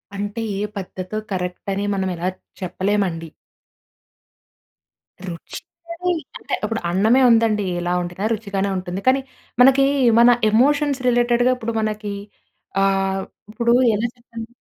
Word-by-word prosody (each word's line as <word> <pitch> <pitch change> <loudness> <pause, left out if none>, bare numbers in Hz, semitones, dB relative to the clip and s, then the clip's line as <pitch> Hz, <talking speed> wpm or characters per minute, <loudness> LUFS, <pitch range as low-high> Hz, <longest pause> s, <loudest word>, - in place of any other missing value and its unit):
అంటే 205 +3 -4 0.2
ఏ - - -2 0.2
పద్ధతో 185 +1 -5
కరెక్ట్ 180 -1 -4
అని 200 +1 -2
మనం 190 -1 -1
ఇలా 175 +2 -1 0.3
చెప్పలేమండి. 185 -2 -1 2.0
రుచి 170 -2 -7 0.4
అని 360 +1 0 0.3
అంటే, - - -7
ఇప్పుడు 225 0 -2
అన్నమే 220 +8 +4
ఉందండి. 225 -3 +3
ఎలా 175 0 -1
వండినా 175 +3 -4
రుచిగానే 200 -2 -2
ఉంటుంది. 185 +1 -4
కానీ 265 +1 +4 0.4
మనకి 270 +2 +6 0.3
మన 235 +1 +7 0.2
ఎమోషన్స్ 285 +4 +2
రిలేటెడ్‌‌గా 240 +1 +3
ఇప్పుడు 230 -1 -4
మనకి 215 -1 -3 0.7
ఆహ్, 195 0 +1 0.3
ఇప్పుడు 235 +1 +1 0.2
ఎలా 220 +3 0
చెప్పండి? 230 -2 -9
210 Hz, 120 wpm, -21 LUFS, 190-235 Hz, 2.0 s, మన